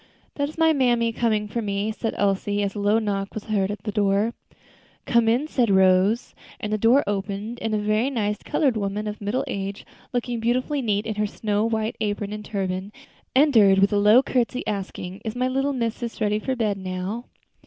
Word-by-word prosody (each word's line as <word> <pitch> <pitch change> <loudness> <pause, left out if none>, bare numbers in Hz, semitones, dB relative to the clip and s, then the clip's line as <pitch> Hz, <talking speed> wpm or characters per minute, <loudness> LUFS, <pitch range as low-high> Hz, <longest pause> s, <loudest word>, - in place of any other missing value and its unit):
"That 285 0 -1
is 310 - -12
mammy 255 -8 +3
coming 215 -3 0
for 230 +3 -3
me," 200 0 -1
said 225 +1 -3
Elsie, 205 +1 +1
as 195 -1 -2
a 210 - -5
low 205 +2 +3
knock 200 -3 -2
was 215 - -4
heard 200 -3 0
at 205 - -5
the 210 - -3
door. 205 +2 +1 0.7
"Come 235 -1 +3
in," 250 +7 +1
said 245 -7 +1
Rose, 190 +4 +3 0.3
and 210 0 -3
the - - +2
door 240 +6 +5
opened, 205 +3 -3
and 220 -1 -1
a - - +2
very 215 +4 +1
nice 210 -5 -1
colored 270 -6 +1
woman 205 0 -2
of 210 0 -5
middle 205 +6 -1
age, 195 0 -5 0.3
looking 245 -1 -2
beautifully 255 +5 0
neat 210 -3 0
in 220 - -2
her 210 0 -1
snow 210 0 -1
white 220 -1 -1
apron 205 -1 -2
and 210 0 -6
turban, 190 -1 -3 0.4
entered 230 -9 +6
with 195 +2 +3
a 205 - +3
low 215 +6 +6
courtesy, 250 -1 -1
asking, 195 -1 -5
"Is 220 0 -4
my 250 +1 +1
little 270 +2 0
missus 235 -2 -3
ready 210 0 +1
for 260 +4 -2
bed 210 -5 -1
now?" 190 +5 -4
215 Hz, 195 wpm, -24 LUFS, 200-235 Hz, 0.7 s, entered